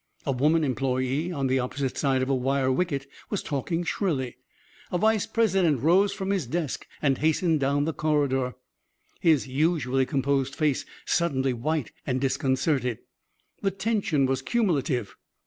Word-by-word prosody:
A 140 - +1
woman 150 +5 +2
employee 130 +4 0
on 140 -5 -2
the 130 0 +2
opposite 130 +1 -2
side 135 -2 +1
of 130 - -2
a - - +3
wire 130 +1 +1
wicket 140 -1 -1 0.2
was 205 - -2
talking 165 +4 -2
shrilly. 140 - -1 0.6
A 180 - +1
vice 220 +2 +2
president 185 - +2
rose 190 +5 +4
from 195 -1 -3
his 185 -10 -1
desk 160 +1 -3 0.2
and 135 -3 +2
hastened 160 +1 +2
down 140 +1 +1
the 160 - -1
corridor, 140 -5 0 0.6
his 155 -5 +3
usually 135 -2 +1
composed 135 -2 0
face 150 -4 0 0.2
suddenly 135 -7 +1
white 145 +2 -2 0.2
and 130 -1 0
disconcerted. 130 -2 0 0.6
The 195 - +2
tension 195 -7 0
was 130 0 0
cumulative. 145 - 0
140 Hz, 145 wpm, -26 LUFS, 130-170 Hz, 0.6 s, rose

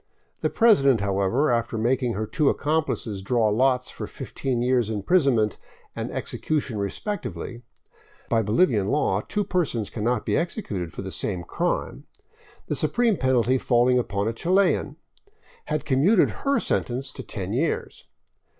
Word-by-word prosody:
The - - +1
president, 140 - +4
however, 100 +8 +1
after 115 -1 0
making 120 +2 +1
her 110 +1 -2
two 150 - +1
accomplices 145 -9 -1
draw 110 +2 +2
lots 125 +3 +2
for - - -6
fifteen 125 -3 -3
years' 125 -3 +2
imprisonment 110 - +2 0.4
and - - -4
execution 140 -8 -3
respectively 120 - -4 0.3
— - - -30
by 115 -1 +2
Bolivian 110 - +2
law 105 -7 +1
two 205 - -2
per 180 -2 +1
sons 115 -8 -4
cannot 115 +1 -1
be - - +1
executed 105 - -3
for - - -7
the 95 - -6
same 90 -3 -2
crime 175 - -2 0.3
— 450 +2 -28
the - - -1
supreme 235 -3 +1
penalty 130 - +2
falling 125 0 +3
upon 100 -3 -1
a 115 - -1
Chilian, 185 +10 +1 0.7
had 155 -1 -2
commuted 155 +10 +4 0.2
her 280 - +3
sentence 130 +3 -2
to - - -8
ten 100 -5 -5
years. 150 +7 -2
125 Hz, 150 wpm, -25 LUFS, 110-155 Hz, 0.7 s, president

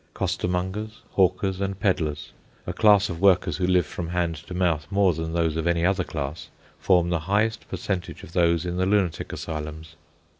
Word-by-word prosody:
Costermongers, 95 +5 -2
hawkers, 95 0 +1
and 100 0 -2
pedlars, 75 -6 -1 0.3
a - - -3
class 105 -2 +5
of 85 -1 -6
workers 95 -3 +4
who 90 -1 0
live 90 -2 +3
from 85 +2 -6
hand 85 -1 0
to 85 +4 -9
mouth 85 -5 0
more 100 -2 +3
than 80 +1 -4
those 85 -2 +1
of 80 +1 -1
any 85 0 +2
other 95 0 +2
class, 75 -1 -5 0.3
form 90 -2 +3
the 85 - +1
highest 110 +2 +1
percentage 95 -3 -4
of 85 - -12
those 85 -1 +2
in 90 0 -3
the 95 0 +1
lunatic 95 -4 0
asylums. 80 0 -6
90 Hz, 180 wpm, -25 LUFS, 80-95 Hz, 0.3 s, class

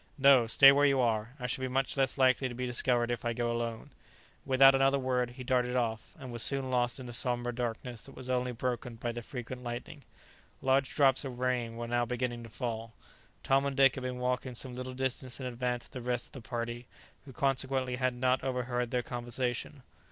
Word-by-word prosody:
"No, 135 -4 +6
stay 135 +4 +8
where 145 +1 +4
you 135 -1 +2
are; 115 0 0
I 125 - -5
shall 130 +2 -2
be 130 - -1
much 130 +1 -1
less 135 0 +1
likely 130 0 +3
to 120 - -7
be 125 +1 -3
discovered 120 -1 +1
if 120 -3 -3
I 120 -1 -1
go 120 0 -1
alone." 115 -1 -4 0.6
Without 135 0 +7
another 135 +1 +3
word, 125 -2 0
he 125 +1 -9
darted 125 -1 +1
off, 115 -3 -2
and 130 -4 -8
was 120 -1 -3
soon 135 0 +4
lost 125 0 0
in 130 - -8
the 120 - -7
sombre 120 0 0
darkness 120 -1 -4
that 135 - -13
was 130 - -8
only 125 0 0
broken 120 0 -3
by 120 +1 -3
the 120 0 -6
frequent 125 +1 -7
lightning. 120 +5 -6 0.6
Large 135 0 +1
drops 140 -2 +4
of 130 -3 -6
rain 125 -2 -1
were 120 0 -5
now 120 0 +1
beginning 120 0 -3
to 115 - -10
fall. 115 -1 -5 0.5
Tom 135 0 +3
and 140 0 -2
Dick 135 -1 +6
had 130 - -6
been 125 0 -4
walking 125 0 -2
some 125 +1 -5
little 125 +1 -6
distance 130 0 -3
in 130 - -5
advance 125 -1 -2
of - - -20
the 125 - -6
rest 120 0 -2
of - - -31
the - - -18
party, 120 0 -4 0.4
who 135 - -10
consequently 130 -1 0
had 130 -1 0
not 125 +1 +1
overheard 125 -2 -2
their 125 0 -1
conversation. 120 +3 -4
125 Hz, 220 wpm, -31 LUFS, 120-130 Hz, 0.6 s, stay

